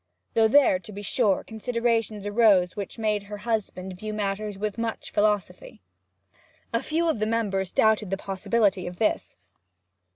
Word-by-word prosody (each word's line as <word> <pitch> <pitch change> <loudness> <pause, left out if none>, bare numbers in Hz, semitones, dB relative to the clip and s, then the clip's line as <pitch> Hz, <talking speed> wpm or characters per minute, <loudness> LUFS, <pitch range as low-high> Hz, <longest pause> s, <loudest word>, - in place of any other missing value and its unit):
Though 225 -1 +4
there, 240 -6 +5
to 200 - -11
be 205 0 -8
sure, 200 -1 +1
considerations 225 -2 -1
arose 205 -4 +4
which 200 +1 -6
made 215 -2 0
her 205 +1 -8
husband 205 -4 -3
view 215 0 -5
matters 205 0 -3
with 210 +2 -3
much 230 -1 -4
philosophy. 210 - -1 0.9
A 230 - +1
few 330 +2 0
of 315 -9 0
the 215 - 0
members 200 -5 -1
doubted 220 -2 +2
the 195 - -1
possibility 195 0 0
of 175 0 -7
this. 215 - -1
210 Hz, 155 wpm, -26 LUFS, 195-225 Hz, 0.9 s, there